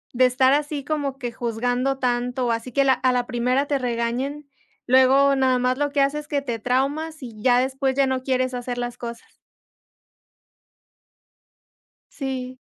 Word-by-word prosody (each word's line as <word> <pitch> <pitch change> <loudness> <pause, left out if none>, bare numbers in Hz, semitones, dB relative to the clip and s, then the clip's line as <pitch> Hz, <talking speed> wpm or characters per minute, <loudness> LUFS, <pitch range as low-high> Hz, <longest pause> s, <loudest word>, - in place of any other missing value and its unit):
de 255 +1 +5
estar 260 +1 +3
así 290 -1 -1
como 285 -3 -2
que 245 -3 -4
juzgando 245 +3 -1
tanto, 245 -1 -1
así 230 +2 -3
que 275 +3 +2
la 265 -1 +4
a 255 0 +1
la 245 0 0
primera 250 +3 0
te 285 -1 -1
regañen, 250 +4 -2 0.4
luego 265 +2 +5
nada 260 -1 +2
más 250 +1 +1
lo 290 0 +1
que 285 -1 +1
hace 280 +2 +1
es 300 - -10
que 285 -2 -1
te 235 -4 -3
traumas 280 +6 -1
y 225 -4 -9
ya 245 +1 +4
después 265 +1 0
ya 275 0 +3
no 260 0 -1
quieres 255 -1 0
hacer 245 0 -4
las 245 0 -4
cosas. 235 -1 -8 2.7
Sí. 260 -2 -5
255 Hz, 165 wpm, -23 LUFS, 245-275 Hz, 2.7 s, de